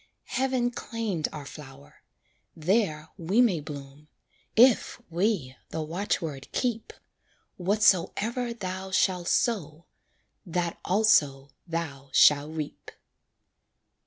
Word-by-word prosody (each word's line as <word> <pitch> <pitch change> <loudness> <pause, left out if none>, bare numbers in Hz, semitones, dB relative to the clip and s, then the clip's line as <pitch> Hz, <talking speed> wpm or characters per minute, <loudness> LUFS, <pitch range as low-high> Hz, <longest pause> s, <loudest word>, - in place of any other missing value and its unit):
Heaven 255 -1 +1
claimed 220 -9 -3
our 150 -2 -7
flower 140 -1 -12 0.5
there 160 -3 0
we 180 +7 +1
may 220 -9 +4
bloom, 145 -1 -9 0.5
If 240 0 +5
we 170 - 0
the 160 - -3
watchword 160 -4 -3
keep: 235 -3 -2 0.7
"Whatsoever 210 +5 +2
thou 190 -4 -5
shall 185 -2 +1
sow, 170 -8 0 0.6
That 175 -2 -2
also 145 -10 +3 0.2
thou 150 -5 -4
shall 145 0 +6
reap." 155 -2 -6
175 Hz, 95 wpm, -27 LUFS, 150-215 Hz, 0.7 s, shall